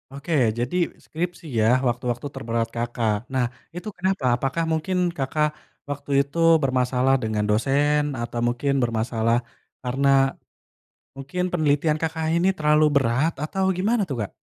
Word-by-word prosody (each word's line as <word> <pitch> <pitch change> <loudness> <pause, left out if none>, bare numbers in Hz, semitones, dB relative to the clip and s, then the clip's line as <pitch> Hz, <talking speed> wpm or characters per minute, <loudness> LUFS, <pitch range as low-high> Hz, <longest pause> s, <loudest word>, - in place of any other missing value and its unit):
Oke, 145 +4 -4 0.3
jadi 125 +8 -2 0.3
skripsi 170 +1 -4
ya 110 - +3 0.2
waktu-waktu 120 +2 -2
terberat 115 -3 -1
Kakak. 120 -2 0 0.2
Nah, 130 -2 +2 0.3
itu 180 +5 -7
kenapa? 190 -3 -1
Apakah 135 +6 -1
mungkin 160 +4 -1 0.2
Kakak 150 +3 +1 0.4
waktu 145 0 -5
itu 140 +4 -2 0.3
bermasalah 130 0 +2
dengan 110 -1 -1
dosen, 145 +7 +2 0.2
atau 120 0 -4
mungkin 125 +4 0
bermasalah 115 0 +1 0.5
karena 130 +3 0 1.1
mungkin 140 +7 -4
penelitian 155 -2 +2
Kakak 160 0 -2
ini 175 +3 +3
terlalu 150 0 +4
berat 135 +5 +2
atau 190 +4 -1
gimana 215 +4 +2
tuh, 135 - -3
Kak? 100 - -6
135 Hz, 135 wpm, -24 LUFS, 120-155 Hz, 1.1 s, terlalu